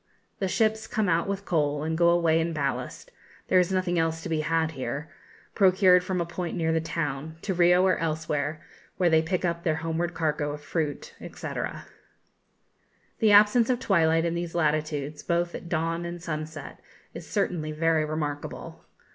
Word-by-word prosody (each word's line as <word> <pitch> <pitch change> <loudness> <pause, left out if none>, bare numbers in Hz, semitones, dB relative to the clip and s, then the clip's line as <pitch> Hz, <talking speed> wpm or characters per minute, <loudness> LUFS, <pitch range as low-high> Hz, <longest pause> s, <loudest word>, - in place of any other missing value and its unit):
The 195 - 0
ships 220 +2 +1
come 215 -2 0
out 170 +1 +1
with 200 0 -3
coal, 150 -4 0
and 160 +1 -1
go 170 +1 +4
away 170 -2 +3
in 165 0 -1
ballast 140 -3 -3 0.4
(there 185 - +5
is 180 0 +1
nothing 185 -2 0
else 165 0 -1
to - - -5
be 160 -1 0
had 160 0 0
here), 145 +2 -5 0.4
procured 185 -2 +5
from 185 -1 -2
a 170 - 0
point 175 +1 -4
near 160 -1 +1
the 160 0 +1
town, 155 -1 -4
to 195 - -1
Rio 180 +1 +4
or 185 - +3
elsewhere, 155 -1 -2 0.3
where 175 -2 +3
they 160 0 +5
pick 180 +3 -1
up 170 -1 -1
their 160 -2 +1
homeward 165 +2 -2
cargo 150 -2 -1
of 150 - -8
fruit, 155 -3 -3
&c. - - -8 1.7
The 220 -3 +4
absence 210 +4 +6
of 250 -2 +1
twilight 165 -7 +2
in 170 - 0
these 170 0 -4
latitudes, 150 -2 -1
both 170 0 -1
at 170 - -7
dawn 165 +1 -1
and 170 0 -5
sunset, 155 -2 -6 0.3
is - - -9
certainly 175 -7 -1
very 160 0 +2
remarkable. 150 -1 -5
165 Hz, 175 wpm, -26 LUFS, 155-180 Hz, 1.7 s, absence